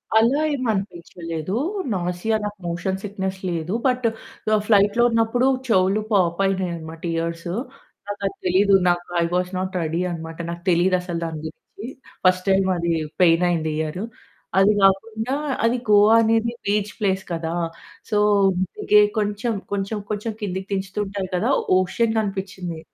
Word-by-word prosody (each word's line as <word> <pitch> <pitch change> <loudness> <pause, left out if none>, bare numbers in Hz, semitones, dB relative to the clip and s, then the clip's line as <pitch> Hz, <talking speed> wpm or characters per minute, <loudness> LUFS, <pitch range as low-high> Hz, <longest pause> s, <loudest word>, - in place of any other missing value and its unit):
అలా 235 +7 +4
ఏమి 255 -3 -2
అనిపించలేదు. 175 -3 -5 0.4
నాసియా 180 +4 -1
నాకు 205 -1 -5
మోషన్ 180 +3 -2
సిక్‌నెస్ 190 -2 -4
లేదు. 170 +1 -3
బట్ 250 -1 0 0.6
ఫ్లైట్ 205 -1 +4
లో - - +6
ఉన్నప్పుడు 230 +2 +2 0.2
చెవులు 195 -1 +3
పాప్ 175 -3 +2
అయినాయనమాట 170 -4 -3
ఇయర్సు. 170 +1 -3 0.5
నాకది 200 -1 -3
తెలీదు 195 +2 +4
నాకు. 175 0 0
ఐ - - +3
వస్ 180 0 0
నాట్ 185 0 -3
రెడీ 165 +2 -1
అనమాట. 165 -1 -6
నాకు 170 0 -6
తెలీదు. 180 +2 +3
అసలు 175 -2 -4
దాని 160 -1 -5
గురించి 195 +7 -9 0.4
ఫస్ట్ 185 0 +3
టైమ్ 190 0 +3
అది 170 0 -1 0.3
పెయిన్ 165 -1 +5
అయింది. 160 -2 0
ఇయరు 160 +5 -3 0.5
అది 195 +2 +6
కాకుండా 220 +5 +2 0.3
అది 230 +2 +3
గోవా 210 +1 +6
అనేది 225 +1 +2
బీచ్ 205 0 0
ప్లేస్ 190 -2 0
కదా! 165 -1 -2 0.6
సో, 210 - +1 0.6
అందుకే 210 - +4 0.2
కొంచెం, 210 +3 -1 0.2
కొంచెం, 200 +2 -2
కొంచెం 210 +2 -2
కిందకిదించుతూ 190 0 -3
ఉంటారు 195 -1 -4
కదా! 180 - 0 0.3
ఓషన్ 220 +5 +1
కనిపించింది. 190 -5 -4
190 Hz, 140 wpm, -22 LUFS, 175-210 Hz, 0.6 s, లో